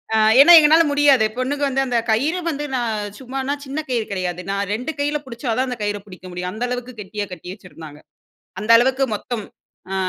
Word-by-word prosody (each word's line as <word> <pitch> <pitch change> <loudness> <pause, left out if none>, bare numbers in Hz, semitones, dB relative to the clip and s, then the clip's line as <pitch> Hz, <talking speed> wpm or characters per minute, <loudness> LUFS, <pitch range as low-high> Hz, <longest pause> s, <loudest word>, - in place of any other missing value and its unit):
அ - - +4 0.2
ஏன்னா 345 +5 +8
எங்கனால 315 +2 +5
முடியாது. 285 -5 +4
பொண்ணுக 270 +3 -2
வந்து 270 0 0
அந்த 245 -1 0
கயிறு 290 +11 +1
வந்து 295 -2 -3
நான் 235 -3 -1 0.2
சும்மானா 265 +1 -4
சின்ன 275 +3 -4
கயிறு 235 -3 -1
கிடையாது. 180 -2 -3
நான் 200 0 -1
2 250 +8 -3
கையில 290 +1 0
புடிச்சா 250 +1 -6
தான் 260 +1 0
அந்த 250 - -4
கயிற 205 0 -2
புடிக்க 185 -2 -14
முடியும். 180 +1 -5
அந்த 225 +3 -3
அளவுக்கு 250 0 -5
கெட்டியா 205 +1 -5
கட்டி 180 +1 -8
வச்சிருந்தாங்க. 160 -6 -13 0.6
அந்த 215 +2 -4
அளவுக்கு 265 +3 +2
மொத்தம். 215 +1 -5 0.5
ஆ, - - -2
245 Hz, 190 wpm, -20 LUFS, 205-270 Hz, 0.6 s, ஏன்னா